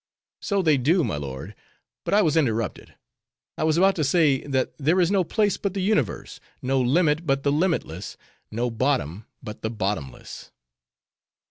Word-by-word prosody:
"So 200 -2 0
they 155 -4 +4
do, 160 +8 +2
my 110 - -2
lord; 70 +6 -6 0.5
but - - +1
I 210 - +5
was 155 -2 +1
interrupted. 115 - -1 0.6
I - - -3
was 155 0 +2
about 195 +2 +4
to 155 - +1
say, 140 -2 +3
that 130 -2 0
there 160 +6 +2
is 175 0 +3
no 195 -2 +3
place 205 +3 +1
but 200 -1 -3
the 195 - -1
universe; 185 - -1 0.2
no 130 +1 0
limit 155 +5 +2
but 135 0 +1
the 140 - +2
limitless; 145 - -1 0.3
no 120 +2 -2
bottom 115 - -1 0.2
but 110 -2 -8
the 110 - -2
bottomless." 100 - -5
140 Hz, 165 wpm, -24 LUFS, 115-170 Hz, 0.6 s, I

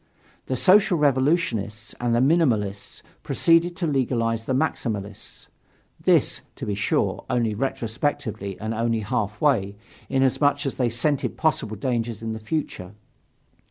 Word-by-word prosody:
The 130 - -1
Social 185 - +5
Revolutionists 130 - 0
and 120 -1 +1
the 120 - +3
Minimalists 110 - +1 0.2
proceeded 170 +1 +2
to 180 - -2
legalize 115 -6 0
the 130 - 0
Maximalists 105 -9 -3 0.6
this, - - +3
to - - -6
be 105 - -2
sure, 100 0 0
only 120 -3 +1
retrospectively 115 -3 -3
and 110 +1 -3
only 115 0 0
half 105 -1 -2
way, 115 -10 +2 0.3
inasmuch 140 +2 +2
as 135 - -1
they 125 -2 0
scented 130 +2 -1
possible 135 -9 0
dangers 115 0 -2
in 110 0 -3
the 110 - -6
future. 110 - -4
120 Hz, 130 wpm, -24 LUFS, 110-145 Hz, 0.6 s, Social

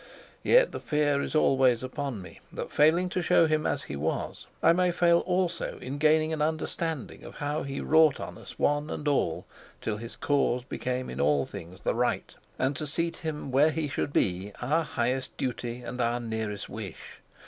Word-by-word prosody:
Yet - - +5
the - - -5
fear 145 -2 +1
is - - -4
always 130 -5 +4
upon 130 -5 -4
me - - -12
that, - - -5
failing 165 +5 +4
to 180 - -1
show 165 0 +5
him 155 -1 +1
as - - -1
he - - -6
was, 75 +3 -3 0.2
I - - +7
may 180 0 +2
fail 170 -1 +4
also 180 0 -1
in 135 +3 -6
gaining 155 +1 +3
an 155 - -2
understanding 160 -1 -2
of - - -10
how 145 +1 -2
he 140 0 -4
wrought 160 -2 +5
on - - -6
us, - - -11
one 145 +1 +1
and 150 - -4
all, 135 - +1 0.3
till 105 -2 -2
his 115 +2 -8
cause 140 -4 +1
became 125 -1 -3
in - - -4
all 70 -1 +3
things 90 +3 -10
the - - 0
right, 120 +1 -1 0.2
and 130 +2 0
to 150 - -3
seat 165 +3 -1
him 155 -5 -4
where 140 +4 +5
he 155 -1 -1
should 140 - -2
be 95 -4 0
our 150 +7 +1
highest 130 -2 -2
duty 125 -1 -3
and 125 +1 -4
our 120 +1 +1
nearest 110 -3 -4
wish. - - -8
140 Hz, 190 wpm, -28 LUFS, 120-155 Hz, 0.3 s, I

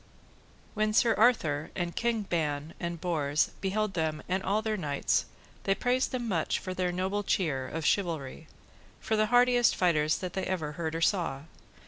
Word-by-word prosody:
When 215 0 0
Sir 230 +1 +4
Arthur 160 -11 +2
and 175 -2 -3
King 230 -2 0
Ban 155 -4 -2
and 170 -1 -4
Bors 155 -4 0
beheld 200 +1 -1
them 155 -2 -2
and 190 +1 0
all 205 +3 0
their 220 -1 0
knights, 145 -7 0 0.4
they 195 - +3
praised 250 +3 +1
them 245 -2 -3
much 170 -7 0
for 185 - -5
their 185 -1 -1
noble 190 +3 -1
cheer 150 -10 0
of 160 +2 -4
chivalry, 160 -6 -1 0.5
for 220 - -1
the 215 0 +2
hardiest 245 0 +4
fighters 155 -4 +2
that 185 -1 -6
ever 185 -5 -2
they 150 - -13
heard 160 -1 -2
or 165 - -3
saw. 165 -7 +1
180 Hz, 170 wpm, -29 LUFS, 155-215 Hz, 0.5 s, Sir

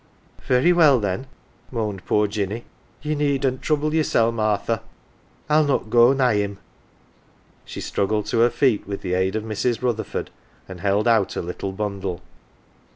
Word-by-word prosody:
"" - - -34
" - - -22
Very 130 +8 +4
well, 155 -7 +5
then,"" 105 +5 -3 0.4
moaned 105 -6 -4
poor 105 0 +3
Jinny. 105 +2 -3 0.2
" - - -34
Ye 150 0 -1
needn't 140 -3 0
trouble 150 0 0
yersel', 115 -7 +2
Martha; 110 0 0 0.7
I'll 155 +1 +4
not 140 -6 -1
go 120 +1 +6
nigh 130 -5 +2
him." 100 -1 -2 1.1
She - - -7
struggled 105 +1 -1
to 115 - +1
her 120 +1 +5
feet 125 -7 +1
with 100 -1 -5
the 90 -2 -2
aid 95 +2 0
of 110 - -2
Mrs. 110 +2 -2
Rutherford, 115 -3 -2 0.4
and 95 -2 -9
held 100 +3 +1
out 115 -4 +3
her - - -3
little 90 +3 -5
bundle. 95 -4 -4
110 Hz, 165 wpm, -22 LUFS, 100-130 Hz, 1.1 s, go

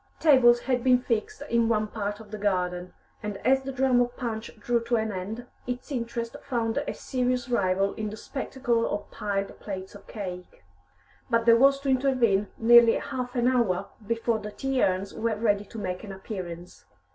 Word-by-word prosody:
Tables 245 -6 +6
had 250 -2 0
been 255 -1 +6
fixed 230 -4 -2
in 235 -1 +2
one 215 -2 +2
part 205 -1 -4
of 215 -2 -13
the 215 - -6
garden, 180 -3 -1 0.3
and 210 -1 -4
as 265 +1 +4
the 270 0 -5
drama 255 -2 +3
of 245 +1 -13
Punch 230 -3 -4
drew 240 +3 +1
to 235 +1 +1
an 220 -1 0
end, 205 +6 -5 0.2
its 250 +4 -5
interest 235 -2 -3
found 235 -4 -1
a 290 - -3
serious 250 -1 -2
rival 195 -3 +1
in 215 -1 -4
the 215 - -8
spectacle 245 -3 -1
of 205 0 -4
piled 200 -1 -3
plates 190 -2 -6
of 205 - -14
cake. 180 - -7 0.7
But 230 -1 +2
there 230 -1 +7
was 275 +3 +5
to 275 - -2
intervene 250 -7 +2
nearly 235 0 +7
half 250 -2 -4
an 245 0 +2
hour 235 -8 +1 0.2
before 230 0 0
the 210 - -6
tea 270 +4 -1
urns 190 +1 0
were 230 -1 -1
ready 210 -2 +1
to 225 - -11
make 185 -2 -4
an 205 - -7
appearance. 180 -3 -7
230 Hz, 185 wpm, -27 LUFS, 205-245 Hz, 0.7 s, there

